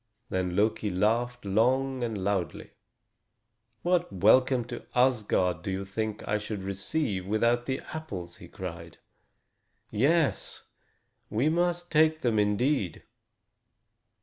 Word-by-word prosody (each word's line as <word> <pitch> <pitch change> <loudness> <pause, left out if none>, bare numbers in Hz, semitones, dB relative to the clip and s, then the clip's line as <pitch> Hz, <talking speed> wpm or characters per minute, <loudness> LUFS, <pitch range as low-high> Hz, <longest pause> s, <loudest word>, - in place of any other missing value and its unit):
Then 90 -1 -1
Loki 105 +1 +1
laughed 115 +5 0
long 130 +6 +1
and 115 -3 -2
loudly. 95 -5 -2 1.1
"What 175 0 +1
welcome 120 +6 +4
to 120 0 -7
Asgard 105 -9 +2
do 95 - -5
you 95 +1 -2
think 110 +2 -4
I 105 +1 +1
should 105 -2 -5
receive 100 +1 -2
without 115 +3 +1
the 130 -1 -2
apples?" 95 - -6
he - - -12
cried. 85 -3 -8 0.9
"Yes, 145 +8 +1 0.7
we 120 +8 +1
must 175 +1 0
take 155 0 +4
them, 115 -4 +2
indeed." 105 - 0
110 Hz, 115 wpm, -28 LUFS, 95-130 Hz, 1.1 s, welcome